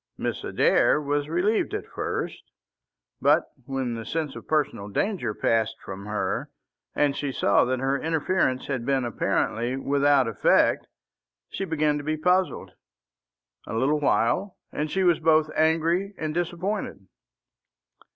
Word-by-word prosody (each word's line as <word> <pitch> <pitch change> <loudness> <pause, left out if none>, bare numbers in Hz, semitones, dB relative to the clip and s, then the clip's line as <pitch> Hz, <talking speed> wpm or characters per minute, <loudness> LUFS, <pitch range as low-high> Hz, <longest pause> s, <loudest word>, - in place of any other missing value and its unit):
Mrs. - - -3
Adair - - +4
was 145 0 -1
relieved 205 - +1
at 420 - -4
first, - - -4 0.8
but - - +3 0.2
when 135 -3 -2
the 115 -1 -5
sense 150 +3 -3
of - - -10
personal 145 -10 0
danger 185 - -1
passed 110 -1 +1
from 100 +1 -7
her, 105 0 -2 0.5
and 145 -1 +2
she 145 -1 -2
saw 100 -4 +3
that 130 +1 0
her 135 +2 0
interference 160 -4 0
had 130 -4 -3
been 135 0 0
apparently 120 +1 -1
without 140 -1 +3
effect, 115 - +2 0.6
she 195 - -4
began 155 -3 +1
to - - -7
be 155 +1 -1
puzzled. 180 +3 +1 1.0
A - - -4
little 140 +6 +2
while, 145 - +1
and 150 +1 -2
she 190 +4 0
was 175 -3 +4
both 155 -1 +3
angry 165 +5 +1
and 155 -1 -3
disappointed. 175 - -3
150 Hz, 140 wpm, -25 LUFS, 130-165 Hz, 1.0 s, Adair